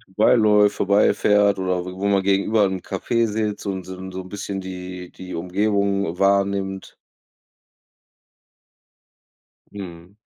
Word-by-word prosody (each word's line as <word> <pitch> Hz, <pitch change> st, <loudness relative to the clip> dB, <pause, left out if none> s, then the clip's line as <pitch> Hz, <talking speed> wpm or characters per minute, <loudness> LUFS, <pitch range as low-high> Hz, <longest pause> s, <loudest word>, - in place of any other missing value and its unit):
vorbei 100 Hz, +5 st, +3 dB
läuft, 105 Hz, -2 st, +4 dB
vorbei 100 Hz, +1 st, +3 dB
fährt 105 Hz, -1 st, +3 dB
oder 90 Hz, -1 st, -1 dB
w 90 Hz, -, -6 dB
wo 95 Hz, +2 st, -3 dB
man 100 Hz, -1 st, +2 dB
gegenüber 100 Hz, +2 st, +2 dB
'n 95 Hz, -1 st, -3 dB
Café 115 Hz, +4 st, -1 dB
sitzt 105 Hz, -1 st, -3 dB
und 95 Hz, -2 st, -4 dB
so'n 95 Hz, 0 st, -8 dB
so'n 95 Hz, 0 st, -7 dB
bisschen 100 Hz, -1 st, -5 dB
die 90 Hz, -1 st, -8 dB
die 90 Hz, 0 st, -9 dB
Umgebung 100 Hz, 0 st, 0 dB
wahrnimmt. 100 Hz, -1 st, 0 dB, 2.8 s
Mhm. 90 Hz, -1 st, -10 dB
100 Hz, 120 wpm, -22 LUFS, 95-100 Hz, 2.8 s, läuft